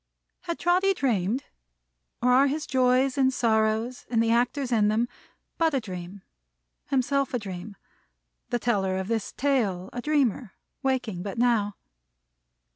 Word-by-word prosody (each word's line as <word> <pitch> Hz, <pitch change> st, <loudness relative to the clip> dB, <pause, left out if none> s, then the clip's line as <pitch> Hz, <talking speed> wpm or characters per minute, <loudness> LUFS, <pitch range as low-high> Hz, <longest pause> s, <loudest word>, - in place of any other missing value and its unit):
Had 340 Hz, -2 st, -3 dB
Trotty 370 Hz, +3 st, +2 dB
dreamed? 235 Hz, -, 0 dB, 0.8 s
Or 250 Hz, -, +4 dB
are 270 Hz, +3 st, +5 dB
his 295 Hz, +1 st, -2 dB
joys 260 Hz, +1 st, +2 dB
and 260 Hz, -1 st, +4 dB
sorrows, 225 Hz, 0 st, 0 dB
and 230 Hz, -, +1 dB
the 225 Hz, -, +1 dB
actors 250 Hz, +3 st, +1 dB
in 215 Hz, -3 st, +3 dB
them, 220 Hz, +3 st, +1 dB, 0.5 s
but 325 Hz, -3 st, +2 dB
a -, -, +2 dB
dream; 185 Hz, -2 st, -8 dB, 0.6 s
himself 275 Hz, 0 st, 0 dB
a -, -, +3 dB
dream; 200 Hz, -1 st, -7 dB, 0.7 s
the 240 Hz, -, +1 dB
teller 195 Hz, -6 st, 0 dB
of 190 Hz, +2 st, -4 dB
this 225 Hz, -3 st, -1 dB
tale 215 Hz, -10 st, 0 dB
a 245 Hz, -, -4 dB
dreamer, 265 Hz, -6 st, 0 dB, 0.3 s
waking 250 Hz, -9 st, -1 dB
but 200 Hz, +2 st, -5 dB
now? 230 Hz, -4 st, +2 dB
240 Hz, 140 wpm, -26 LUFS, 210-270 Hz, 0.8 s, are